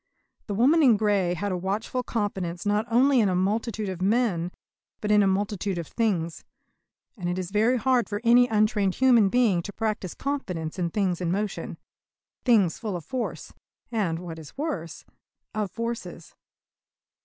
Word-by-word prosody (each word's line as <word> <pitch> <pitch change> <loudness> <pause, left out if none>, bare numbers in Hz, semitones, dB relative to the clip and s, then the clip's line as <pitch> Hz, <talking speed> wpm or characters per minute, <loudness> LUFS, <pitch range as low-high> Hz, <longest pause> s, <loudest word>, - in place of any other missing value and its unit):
The 205 - -3
woman 280 +10 +4
in 245 -7 +6
grey 200 -4 +1
had 200 +4 -2
a - - 0
watchful 200 +7 -2
confidence 195 -7 -3
not 210 +2 +1
only 255 +3 +4
in 210 -4 +3
a 185 - 0
multitude 210 +3 -1
of 185 -2 -5
men 195 -4 +1 0.5
but 210 - -1
in 210 0 +6
a 200 - +3
multitude 200 -1 -1
of 170 - -3
things. 175 -6 -1 0.7
And 180 -6 -4
it 175 - -2
is 185 0 -4
very 225 +5 +3
hard 250 +1 +1
for 205 -1 -2
any 245 +1 +6
untrained 210 -3 +1
human 240 -6 +5
being 220 -7 +3
to 205 - -7
practise 215 -4 -3
confidence 185 - -4
in 170 -1 0
things 185 -2 -1
in 170 -1 0
motion 205 +2 -3 0.7
things 210 -10 +3
full 215 -5 -3
of 170 - -6
force, 255 -3 -4 0.4
and, 195 -8 0
what 165 -2 -7
is 155 - -13
worse, 195 - -4 0.5
of 210 -2 -2
forces. 225 -6 -6
205 Hz, 165 wpm, -26 LUFS, 180-230 Hz, 0.7 s, in